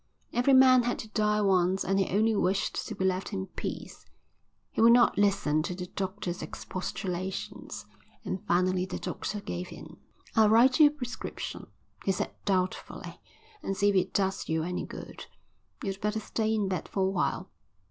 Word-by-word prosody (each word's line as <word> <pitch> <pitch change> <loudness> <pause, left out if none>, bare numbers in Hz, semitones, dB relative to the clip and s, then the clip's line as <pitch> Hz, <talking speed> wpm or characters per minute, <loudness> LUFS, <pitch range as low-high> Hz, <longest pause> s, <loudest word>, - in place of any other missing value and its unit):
Every 250 +3 +4
man 260 -1 +7
had 245 0 -1
to 220 - -8
die 210 -1 +1
once 190 -1 +2
and 195 0 +1
he 195 - +1
only 220 +3 +2
wished 195 0 0
to - - -5
be 190 - -1
left 185 +2 -1
in 190 -1 -2
peace. - - -7 0.6
He - - -1
would 230 +1 +8
not 240 0 +5
listen 195 -7 +2
to 180 +3 -4
the 180 0 -5
doctor's 185 -1 -4
expostulations, 185 0 -5 0.4
and 185 - -3
finally 185 +1 +2
the 185 - -4
doctor 205 +1 -4
gave 90 - -5
in. - - -11 0.4
"I'll 220 -1 +6
write 245 +5 +5
you 305 - +9
a - - +3
prescription," 260 -5 -6 0.4
he 195 - +2
said 190 - -2
doubtfully, 185 -2 -2 0.4
"and 195 - -3
see 205 +1 +4
if 200 - +1
it 185 0 +2
does 190 -1 -1
you 160 0 +1
any 180 +2 -3
good. - - -9 0.6
You'd 195 -1 -3
better 210 +1 0
stay 220 +1 -1
in 215 -3 +1
bed 185 -4 -3
for 195 - -2
a - - +3
while." 185 0 -1
195 Hz, 180 wpm, -29 LUFS, 185-215 Hz, 0.6 s, you